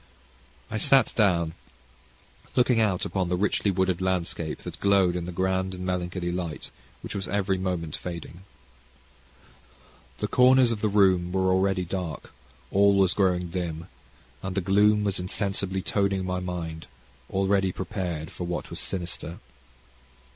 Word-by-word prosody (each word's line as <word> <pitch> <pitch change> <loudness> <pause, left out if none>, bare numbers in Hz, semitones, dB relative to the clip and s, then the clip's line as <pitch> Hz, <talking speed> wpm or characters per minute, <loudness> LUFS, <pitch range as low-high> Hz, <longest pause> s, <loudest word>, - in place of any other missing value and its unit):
I 110 - -1
sat 130 +3 +4
down, 85 -7 +2 1.0
looking 125 -2 +4
out 100 -5 +1
upon 95 -3 -1
the 90 - +1
richly 100 +1 +1
wooded 95 -2 +1
landscape 90 -3 -2
that - - -7
glowed 100 -3 +3
in 90 -1 -3
the 90 - -5
grand 95 +1 -1
and 90 0 -6
melancholy 90 -1 -2
light 85 -3 -4 0.3
which - - -6
was 95 -1 -3
every 95 -2 0
moment 90 -4 -2
fading. 85 0 -7 1.8
The - - -2
corners 125 -1 +5
of 110 -3 -3
the 110 - +2
room 95 -3 +3
were 95 0 +2
already 95 0 +2
dark; 90 -2 -5 0.4
all 100 +1 +5
was 95 -2 +4
growing 90 -3 +1
dim, 85 -1 -4 0.5
and 95 -1 -4
the - - +2
gloom 105 +3 +4
was 100 -2 0
insensibly 95 +1 -2
toning 100 -2 0
my 90 0 -1
mind, 85 -3 -5 0.4
already 95 0 +1
prepared 90 -4 -4
for 90 - -5
what 85 - -4
was - - -5
sinister. 85 -2 -5
95 Hz, 145 wpm, -26 LUFS, 90-100 Hz, 1.8 s, corners